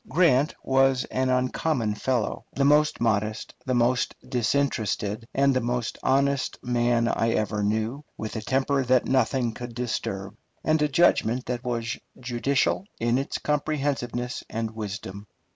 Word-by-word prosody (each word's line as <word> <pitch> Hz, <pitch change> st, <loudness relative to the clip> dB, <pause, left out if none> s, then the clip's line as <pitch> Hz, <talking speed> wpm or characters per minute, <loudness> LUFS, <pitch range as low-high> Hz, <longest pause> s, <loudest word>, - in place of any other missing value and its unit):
Grant 150 Hz, -5 st, +3 dB
was 135 Hz, -1 st, +3 dB
an 130 Hz, 0 st, 0 dB
uncommon 125 Hz, -2 st, +1 dB
fellow 120 Hz, 0 st, -1 dB
the 140 Hz, -, +2 dB
most 150 Hz, +1 st, +4 dB
modest, 110 Hz, -1 st, 0 dB
the 130 Hz, -, +1 dB
most 120 Hz, +1 st, +2 dB
disinterested, 115 Hz, -4 st, 0 dB
and 140 Hz, 0 st, +3 dB
the 130 Hz, -, +2 dB
most 120 Hz, -1 st, -2 dB
honest 140 Hz, 0 st, +1 dB
man 120 Hz, -1 st, +2 dB
I 115 Hz, 0 st, +1 dB
ever 105 Hz, -1 st, 0 dB
knew, 110 Hz, +7 st, -1 dB
with 110 Hz, +1 st, -5 dB
a 110 Hz, -, -2 dB
temper 135 Hz, +4 st, +1 dB
that 125 Hz, 0 st, +3 dB
nothing 125 Hz, -2 st, +1 dB
could 120 Hz, 0 st, -8 dB
disturb, 100 Hz, -5 st, -3 dB, 0.3 s
and 155 Hz, 0 st, +2 dB
a 150 Hz, -, +4 dB
judgment 130 Hz, -5 st, +3 dB
that 125 Hz, 0 st, -3 dB
was 120 Hz, -1 st, -2 dB, 0.2 s
judicial 130 Hz, +7 st, 0 dB
in 120 Hz, +2 st, +2 dB
its 135 Hz, -, -3 dB
comprehensiveness 140 Hz, -5 st, -2 dB
and 115 Hz, 0 st, -3 dB
wisdom. 100 Hz, -2 st, -6 dB
125 Hz, 145 wpm, -26 LUFS, 115-135 Hz, 0.3 s, most